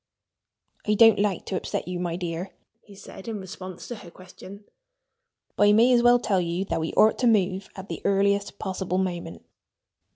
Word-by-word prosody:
"I 210 - +3
don't 225 -1 +6
like 200 -3 0
to 190 - -4
upset - - -3
you, 180 -1 -4
my 175 -1 -2
dear," 175 +1 -4 0.3
he 200 - -16
said 190 +1 -12
in 220 -2 -4
response 185 -1 -9
to 240 - -6
her 195 -4 -12
question. 185 +3 -13 0.9
"But 205 - +4
I 205 - +6
may 235 +4 +5
as 240 - +4
well 240 0 +6
tell 205 -6 0
you 175 +2 -2
that 165 - -2
we 160 - -2
ought 220 - +4
to 250 - +2
move 195 -3 +1
at 190 0 -9
the - - -6
earliest 200 0 +1
possible 185 -1 -3
moment." 175 - -4
195 Hz, 190 wpm, -25 LUFS, 180-210 Hz, 0.9 s, don't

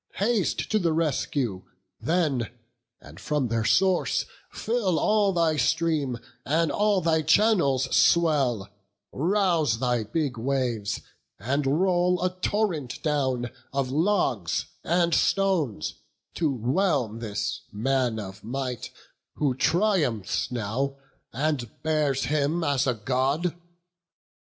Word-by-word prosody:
Haste 210 -1 0
to 215 - +3
the 170 -4 +1
rescue 140 - -1 0.4
then, 140 -3 0 0.5
and - - -14
from 145 -5 -1
their 115 0 0
source 185 - +2 0.3
Fill 220 -7 0
all 210 +4 +3
thy 165 -4 +1
stream, 150 -2 +1 0.3
and 160 +3 +1
all 205 -2 +2
thy 160 -1 +2
channels 155 - +3
swell; 140 - +3 0.4
Rouse 170 - +1
thy 125 -1 0
big 130 +2 -2
waves, 120 -5 -1 0.4
and 140 +2 -1
roll 180 -1 +2
a 185 - +1
torrent 180 - -1
down 130 -6 0 0.2
Of 135 -1 -1
logs 145 - +1 0.2
and 170 0 +2
stones, 165 - +1 0.4
to 160 -4 0
whelm 130 - 0
this 105 -2 -3
man 125 +1 0
of 100 0 -8
might, 125 +1 -4 0.5
Who 145 -4 +1
triumphs 145 - +1
now, 125 +4 -2 0.4
and 135 -2 -1
bears 150 -4 +1
him 155 +3 0
as 140 -2 +1
a 125 - +1
God. 135 +9 0
145 Hz, 115 wpm, -26 LUFS, 125-170 Hz, 0.5 s, to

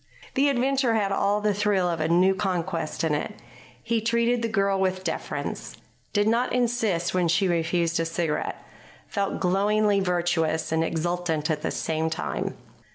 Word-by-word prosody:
The 280 +2 +3
adventure 265 -2 +1
had 200 -3 +1
all 200 +1 +1
the 210 0 +2
thrill 200 -2 +1
of 170 -2 -1
a 155 - +1
new 180 +3 +4
conquest 180 -5 -2
in 160 -2 +1
it. 180 +8 -2 0.5
He 230 -1 0
treated 235 +1 +1
the 230 - 0
girl 200 -3 +1
with 185 0 0
deference, 160 -3 -4 0.3
did 205 0 +2
not 235 +3 +2
insist 225 -8 0
when 180 -2 +2
she 175 +4 +2
refused 170 -1 +1
a 165 - +1
cigarette, 165 -2 -2 0.4
felt 200 -1 -2
glowingly 205 +2 +2
virtuous 175 -4 0
and 160 0 +2
exultant 165 -1 -1
at 150 -1 -2
the - - -1
same 160 0 -1
time. 160 - -3
190 Hz, 160 wpm, -25 LUFS, 165-210 Hz, 0.5 s, new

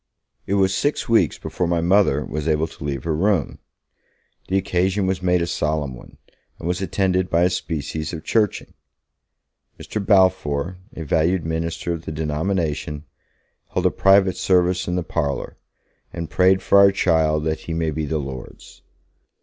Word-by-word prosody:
It 100 - 0
was 95 -1 +2
six 145 +9 -1
weeks 115 -1 +3
before 90 - -3
my 85 0 +1
Mother 85 -4 +3
was 75 0 -4
able 80 0 +2
to 75 - -11
leave 70 -3 -3
her 80 -2 -1
room. 90 -3 0 0.9
The 95 - +1
occasion 95 +1 0
was 95 0 -1
made 90 -1 +2
a - - 0
solemn 75 -4 -2
one, - - -14 0.4
and - - -6
was 90 +1 -1
attended 95 -1 0
by 85 +1 +3
a 90 - +3
species 80 -2 -3
of 80 -2 -7
Churching. 105 -3 0 1.1
Mr. 105 - -4
Balfour, 95 -4 +2 0.2
a 80 - -5
valued 80 +4 +1
minister 80 +1 -2
of 85 -1 -7
the - - -4
denomination, 75 -1 -2 0.7
held - - 0
a - - +4
private 95 -2 +4
service 90 0 +2
in 90 - -1
the 90 - -1
parlour, 70 -5 -3 0.6
and 85 -2 -6
'prayed 95 +1 +3
for 100 - +5
our 100 0 +7
child, 80 -5 +2
that 80 0 -1
he 85 - -6
may 80 -1 0
be 75 +1 -3
the 80 - -1
Lord's'. 65 -3 -8
85 Hz, 165 wpm, -22 LUFS, 80-95 Hz, 1.1 s, our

